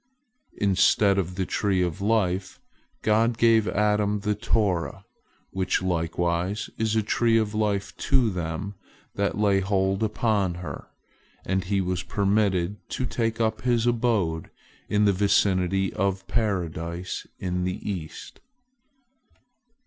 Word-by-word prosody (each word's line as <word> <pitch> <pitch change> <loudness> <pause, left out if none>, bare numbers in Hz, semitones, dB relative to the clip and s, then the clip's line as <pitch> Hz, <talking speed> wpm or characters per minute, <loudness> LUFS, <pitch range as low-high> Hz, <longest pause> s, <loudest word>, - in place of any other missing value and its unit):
Instead 100 0 +3
of 90 -1 -3
the 95 0 -1
tree 95 -2 +1
of 90 0 -3
life, 95 -3 0 0.4
God 115 +2 +2
gave 115 -2 +4
Adam 105 -1 +1
the 105 0 0
Torah, 100 -5 -1 0.5
which 95 -1 0
likewise 85 +2 -1
is 110 0 +1
a 110 - +2
tree 115 +2 +2
of 110 -1 0
life 100 -2 -1
to 130 -5 +2
them 85 +2 -4 0.4
that 100 0 -1
lay 100 -2 +3
hold 95 0 0
upon 105 -4 +1
her, 90 0 -7 0.6
and 95 0 -1
he 100 +1 +1
was 90 -1 -1
permitted 100 -1 +1
to 130 - -2
take 115 -2 -2
up 110 -1 0
his 120 -2 +1
abode 110 -9 0 0.4
in 105 0 +3
the 100 - +4
vicinity 95 -1 +2
of 95 0 -1
Paradise 90 -5 -2
in 90 -1 -2
the 90 0 -4
east. 90 -6 -6
100 Hz, 125 wpm, -25 LUFS, 90-105 Hz, 0.6 s, gave